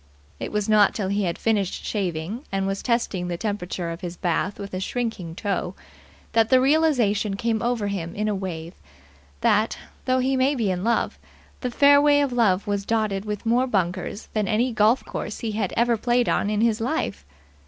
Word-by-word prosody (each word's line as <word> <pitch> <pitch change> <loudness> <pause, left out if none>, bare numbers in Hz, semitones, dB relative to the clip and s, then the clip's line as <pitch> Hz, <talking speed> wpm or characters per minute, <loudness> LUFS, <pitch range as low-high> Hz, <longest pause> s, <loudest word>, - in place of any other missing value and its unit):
It - - -4
was 210 -1 -1
not 210 -2 +4
till 195 -4 -2
he 200 0 0
had 170 -1 -2
finished 205 -4 -1
shaving 190 - -3
and 195 0 0
was 195 0 -2
testing 230 -7 0
the 175 -1 -3
temperature 185 -4 -3
of 165 - -7
his 175 -1 -6
bath 180 +3 -1
with 200 -1 -8
a 185 - -2
shrinking 195 -6 -3
toe 190 -2 -2 0.6
that 225 -1 +3
the 260 - +6
realization 255 -8 +2
came 225 +1 -1
over 235 -3 0
him 185 -4 -3
in 210 +1 -1
a 210 - +1
wave 175 -4 -5 0.7
that, 215 +2 +2 0.3
though 255 0 +2
he 260 +1 +1
might 265 +2 +2
be 215 -5 +1
in 180 0 -2
love, 235 +1 0 0.4
the 250 - -2
fairway 285 +3 +5
of 280 -3 +1
love 205 -6 +2
was 200 -1 -1
dotted 215 -2 -1
with 210 +1 -4
more 245 +3 +2
bunkers 190 -1 -2
than 215 -2 0
any 235 +4 +1
golf 220 +3 +3
course 215 - -5
he 225 - -2
had 210 -3 -1
ever 235 0 +3
played 240 +2 +1
on 205 - +1
in 210 0 0
his 225 -1 +2
life. 100 - -2
210 Hz, 195 wpm, -24 LUFS, 190-235 Hz, 0.7 s, the